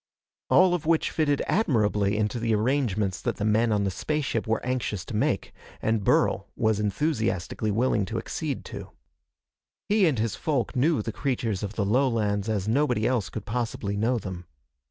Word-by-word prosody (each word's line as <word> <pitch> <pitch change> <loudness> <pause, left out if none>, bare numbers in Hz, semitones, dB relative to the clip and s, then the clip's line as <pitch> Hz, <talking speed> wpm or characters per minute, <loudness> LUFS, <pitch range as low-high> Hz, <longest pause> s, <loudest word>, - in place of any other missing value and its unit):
All 185 -1 +5
of 165 -3 -2
which 165 -1 +2
fitted 145 -3 +1
admirably 105 - +1
into 110 +3 0
the 115 -1 +1
arrangements 105 -6 0
that - - -1
the 105 - -3
men 110 +2 +3
on 105 -1 +2
the 100 - 0
spaceship 135 - -2
were 115 - +1
anxious 120 -6 -2
to 115 - -6
make, 105 - 0 0.3
and 110 -2 0
Burl - - +2
was 110 -2 +1
enthusiastically 110 - -1
willing 110 -1 +1
to - - -4
accede - - -4
to. - - -8 1.0
He 205 -3 +4
and 145 -6 +1
his 110 -1 -1
folk 145 -8 -1
knew 140 -1 +2
the 115 - -3
creatures 115 -7 -1
of 105 0 -5
the 105 - 0
lowlands 110 -3 +1
as 105 -2 -1
nobody 125 -2 +1
else 115 -9 0
could - - -6
possibly 110 -3 -2
know 115 +4 +1
them. 95 -5 -6
110 Hz, 175 wpm, -26 LUFS, 105-130 Hz, 1.0 s, All